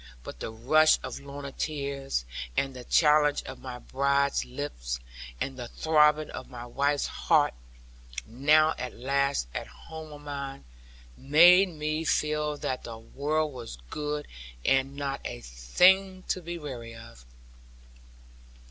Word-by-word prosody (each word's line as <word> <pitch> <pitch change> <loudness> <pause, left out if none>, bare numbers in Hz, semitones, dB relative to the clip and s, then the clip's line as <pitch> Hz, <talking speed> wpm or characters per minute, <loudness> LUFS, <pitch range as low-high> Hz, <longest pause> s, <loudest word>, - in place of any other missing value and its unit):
But - - -9
the - - -4
rush 150 +8 +4
of - - -5
Lorna's 140 0 -8
tears, 140 - -2 0.3
and 135 -1 +1
the 125 - -8
challenge 150 0 +4
of 130 - -8
my 125 -2 -7
bride's 140 +2 +1
lips, - - -5 0.4
and 135 -1 -4
the 120 - -5
throbbing 150 +1 +3
of - - -8
my 120 -2 -8
wife's 140 +4 0
heart - - +2 0.7
(now 150 +7 +4
at 125 - -5
last 140 - 0
at - - -4
home 155 - -10
on 145 0 -11
mine), 140 -1 -6 0.5
made 175 - +6
me 155 -1 -2
feel 150 -1 0
that 130 -2 -3
the 115 -1 -7
world 150 +6 -2
was 120 - -8
good, 150 0 -3 0.4
and 135 +1 +2
not 140 -1 -3
a - - -5
thing 185 - +3
to 185 - 0
be 170 0 -5
weary 120 -7 -7
of. 115 - -13
140 Hz, 140 wpm, -28 LUFS, 125-150 Hz, 0.7 s, made